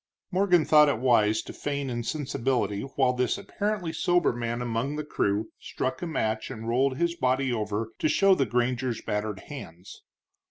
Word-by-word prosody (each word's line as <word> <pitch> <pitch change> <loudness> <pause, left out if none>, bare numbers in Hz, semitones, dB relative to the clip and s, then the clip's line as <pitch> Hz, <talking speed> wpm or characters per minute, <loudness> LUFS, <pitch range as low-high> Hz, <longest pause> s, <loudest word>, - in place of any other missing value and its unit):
Morgan 180 -3 +3
thought 150 -1 +6
it 140 - 0
wise 110 -3 +3
to - - -9
feign 140 -1 -3
insensibility 125 -3 -1
while 130 -2 +3
this 125 -1 0
apparently 200 -3 -3
sober 175 0 +2
man 120 0 -3
among 120 +4 -2
the 150 - -3
crew 105 -7 -1
struck 130 0 -3
a 175 - -3
match 110 -8 -1
and 115 +1 -7
rolled 130 +3 +1
his 170 +1 0
body 130 -2 +1
over 110 0 -2
to 155 - +1
show 195 +3 +5
the 135 -8 +1
granger's 120 +1 -1
battered 105 -1 -3
hands. 95 - -10
130 Hz, 165 wpm, -27 LUFS, 115-150 Hz, -, thought